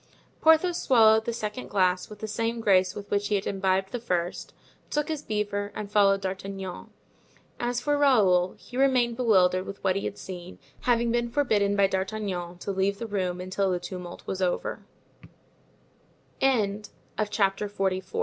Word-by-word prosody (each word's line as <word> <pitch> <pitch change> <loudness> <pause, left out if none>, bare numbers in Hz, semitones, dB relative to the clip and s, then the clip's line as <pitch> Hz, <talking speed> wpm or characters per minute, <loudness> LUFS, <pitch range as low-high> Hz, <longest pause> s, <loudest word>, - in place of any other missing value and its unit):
Porthos 320 +2 +4
swallowed 220 -3 +5
the - - -1
second 220 +1 -5
glass 185 -2 +1
with 210 - -10
the 220 - -3
same 230 +2 -2
grace 190 -4 +3
with 205 0 -8
which 205 0 +1
he 210 - +1
had 195 - -1
imbibed 190 -1 0
the 245 - -3
first, 180 -6 -2 0.4
took 295 +1 -1
his 310 -2 -2
beaver 205 -1 -2
and 210 -1 -6
followed 195 -1 +4
D'Artagnan. 190 -1 -5 0.7
As 240 0 -1
for 290 +2 +1
Raoul, 195 -10 +4
he 245 - -10
remained 255 -3 +3
bewildered 185 -6 +3
with 200 - -8
what 190 -1 +2
he 195 - -2
had - - -4
seen, 180 -1 -8 0.2
having 235 -1 +1
been 240 0 0
forbidden 215 -7 +1
by 200 -1 +4
D'Artagnan 190 -2 -3
to 200 - -3
leave 195 +1 0
the 230 - -5
room 185 -4 -2
until 190 +2 -1
the 180 -1 0
tumult 175 -1 -8
was 190 - -4
over. 180 -1 -1 2.5
Chapter 200 -1 0
XLV. 190 -2 -2
200 Hz, 160 wpm, -27 LUFS, 190-230 Hz, 2.5 s, swallowed